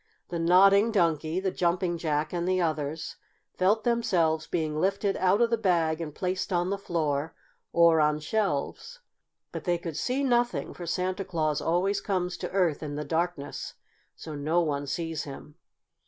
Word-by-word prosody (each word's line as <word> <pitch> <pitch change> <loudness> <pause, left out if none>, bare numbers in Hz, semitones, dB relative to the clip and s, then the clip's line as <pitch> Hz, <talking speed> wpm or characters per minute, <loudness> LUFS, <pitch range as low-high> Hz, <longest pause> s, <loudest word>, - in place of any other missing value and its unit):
The 170 - -3
Nodding 195 +6 +5
Donkey, 165 -4 +1
the 190 0 -1
Jumping 175 -1 0
Jack 155 -1 -1
and 175 0 -1
the 185 0 +2
others 155 -2 -2 0.4
felt 205 +4 +2
themselves 170 -10 +1
being 155 -3 -1
lifted 195 +1 +1
out 190 +4 +3
of 235 0 +3
the 230 - +1
bag 170 -5 +1
and 150 -3 -6
placed 185 +1 -2
on 175 +1 +1
the 200 - 0
floor 160 -5 -2 0.4
or 170 -1 +5
on 150 0 +3
shelves. 210 - -2 0.5
But - - -6
they 175 -2 +2
could 165 -2 -6
see 255 - -1
nothing, 240 -2 +1
for 175 - -8
Santa 185 +3 -1
Claus 155 -5 -1
always 180 +4 +1
comes 180 -3 -1
to - - -4
Earth 180 -6 +1
in 145 -2 -5
the 150 +1 -4
darkness, 165 -1 -3 0.4
so 155 - -8
no 150 +4 0
one 145 -3 -2
sees 165 +1 -3
him. 145 +1 -10
175 Hz, 170 wpm, -28 LUFS, 155-190 Hz, 0.5 s, Nodding